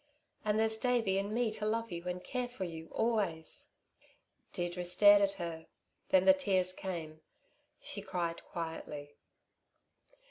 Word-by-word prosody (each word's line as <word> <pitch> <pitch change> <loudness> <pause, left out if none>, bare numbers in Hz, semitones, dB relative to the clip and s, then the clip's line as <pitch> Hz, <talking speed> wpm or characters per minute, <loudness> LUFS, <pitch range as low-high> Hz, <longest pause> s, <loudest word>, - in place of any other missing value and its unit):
And 215 0 +1
there's 220 0 +4
Davey 230 -6 +2
and 200 +1 -3
me 230 0 +1
to 215 0 -4
love 230 +1 -1
you 170 0 -5
and 180 0 -3
care 250 -1 -2
for 245 -6 -6
you, 165 -2 -6
always." 200 -9 -1 0.8
Deirdre 175 0 -3
stared 205 +3 +7
at 200 0 +2
her; 170 -4 -6 0.4
then 190 0 +5
the 285 - +9
tears 190 -10 +1
came; 165 -5 -6 0.6
she 200 - -5
cried 175 -4 -3
quietly. 150 -3 -6
190 Hz, 140 wpm, -33 LUFS, 170-215 Hz, 0.8 s, the